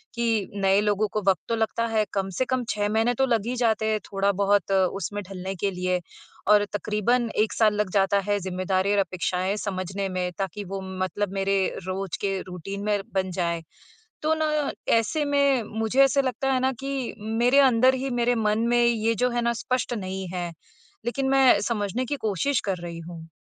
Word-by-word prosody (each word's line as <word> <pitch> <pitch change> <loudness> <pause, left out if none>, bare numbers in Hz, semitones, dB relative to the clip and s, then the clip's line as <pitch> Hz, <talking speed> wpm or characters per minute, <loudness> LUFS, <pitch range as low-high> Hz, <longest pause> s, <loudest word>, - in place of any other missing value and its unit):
कि 225 -4 0
नए 195 0 +3
लोगों 210 0 +1
को 215 - 0
वक़्त 185 - +2
तो 230 - +1
लगता 225 +1 0
है, 220 -1 +1
कम 195 -1 -1
से 255 - +2
कम 255 -1 -1
6 205 0 0
महीने 225 +3 +2
तो 265 - +2
लग 230 -4 +1
ही 250 +1 -2
जाते 220 -2 +2
हैं 215 -1 +1
थोड़ा-बहुत 200 -1 +1
उसमें 195 +1 0
ढलने 190 0 -5
के 195 +2 -1
लिए 180 0 -1 0.5
और 205 -1 +6
तकरीबन 220 +3 0
1 215 0 +2
साल 215 -2 +3
लग 210 -2 0
जाता 200 0 +3
है 205 0 +2
ज़िम्मेदारी 185 +1 -1
और - - +2
अपेक्षाएँ 185 +1 -1
समझने 195 0 -3
में 180 -1 -2
ताकि 195 +1 -3
वो 195 +1 -5 0.2
मतलब 195 +1 -2
मेरे 195 0 +1 0.3
रोज़ 185 -4 -3
के 195 -1 -1
रूटीन 195 +3 -6
में 205 -1 +1
बन 190 -1 0
जाए। 170 -2 -1 0.6
तो 310 +1 +2
ना 305 -2 0 0.2
ऐसे 260 +7 +1
में 280 -4 +2 0.2
मुझे 240 +5 +4
ऐसे 275 +1 +3
लगता 270 +1 -1
है 255 - +2
ना 260 +1 +2
कि, 275 -2 -3
मेरे 235 +5 +2
अंदर 260 -1 +5
ही 265 +1 -3
मेरे 245 +1 +2
मन 215 -1 +1
में 240 0 +3
ये 230 -1 +2
जो 250 +4 +1
है 240 0 0
ना, 235 0 +1
स्पष्ट 250 +1 -2
नहीं 190 -3 -4
है। 175 -1 -3 0.5
लेकिन 265 +2 -1
मैं 270 -1 +5
समझने 230 +2 -1
की 285 - -2
कोशिश 240 +7 +1
कर 190 -2 -1
रही 170 -1 -6
हूँ। 165 -1 -9
210 Hz, 195 wpm, -25 LUFS, 190-240 Hz, 0.6 s, और